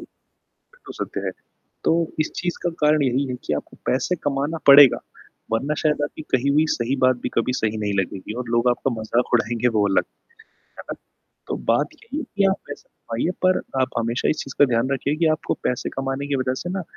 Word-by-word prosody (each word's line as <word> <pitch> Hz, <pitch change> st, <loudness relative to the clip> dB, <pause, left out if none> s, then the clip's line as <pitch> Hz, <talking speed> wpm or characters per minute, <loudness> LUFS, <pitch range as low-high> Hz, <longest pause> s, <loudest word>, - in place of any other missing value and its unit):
ये -, -, -17 dB, 0.6 s
तो -, -, -7 dB
सत्य -, -, -4 dB
है, -, -, 0 dB, 0.5 s
तो -, -, +4 dB, 0.3 s
इस 155 Hz, -, 0 dB
चीज़ 175 Hz, -1 st, -2 dB
का 175 Hz, -, 0 dB
कारण 150 Hz, 0 st, +4 dB
यही 135 Hz, +1 st, +1 dB
है -, -, -2 dB
कि -, -, -2 dB
आपको 75 Hz, -, -6 dB
पैसे 130 Hz, +8 st, +1 dB
कमाना 145 Hz, +3 st, -1 dB
पड़ेगा, 140 Hz, -1 st, +9 dB, 0.5 s
वरना 135 Hz, +7 st, 0 dB
शायद 150 Hz, -1 st, +1 dB
आपकी 145 Hz, -, -7 dB
कही 130 Hz, +2 st, +2 dB
हुई 150 Hz, +3 st, +3 dB
सही 125 Hz, +4 st, -1 dB
बात 130 Hz, -1 st, +3 dB
भी -, -, -1 dB
कभी 115 Hz, +2 st, +1 dB
सही 110 Hz, 0 st, -1 dB
नहीं 105 Hz, -, 0 dB
लगेगी 95 Hz, +2 st, -5 dB
और 120 Hz, -, -12 dB
लोग 120 Hz, +1 st, +3 dB
आपका 120 Hz, +2 st, 0 dB
मज़ाक 115 Hz, +3 st, -1 dB
उड़ाएँगे 120 Hz, +1 st, +2 dB
वो 105 Hz, -1 st, +3 dB
अलग। 95 Hz, -, +2 dB, 0.8 s
है -, -, -7 dB
ना? -, -, -3 dB, 0.5 s
तो -, -, -2 dB, 0.2 s
बात -, -, +2 dB
यही 435 Hz, -9 st, -8 dB
है -, -, -4 dB
कि 200 Hz, -, +4 dB
आप 190 Hz, -, +1 dB
पैसा 145 Hz, -, -9 dB, 0.3 s
कमाइए, 165 Hz, +10 st, 0 dB
पर 185 Hz, 0 st, +4 dB, 0.2 s
आप 130 Hz, -, +1 dB
हमेशा 115 Hz, +1 st, 0 dB
इस 155 Hz, -, +1 dB
चीज़ 135 Hz, -, -9 dB
का 145 Hz, -, +8 dB
ध्यान 115 Hz, +3 st, +1 dB
रखिए 140 Hz, +2 st, 0 dB
कि 170 Hz, -, +2 dB
आपको -, -, -2 dB
पैसे 125 Hz, -, -1 dB
कमाने 135 Hz, +1 st, -3 dB
की 145 Hz, -, 0 dB
वज़ह 130 Hz, -1 st, 0 dB
से 175 Hz, -, -4 dB
ना 185 Hz, 0 st, -3 dB
135 Hz, 215 wpm, -23 LUFS, 120-150 Hz, 0.8 s, पड़ेगा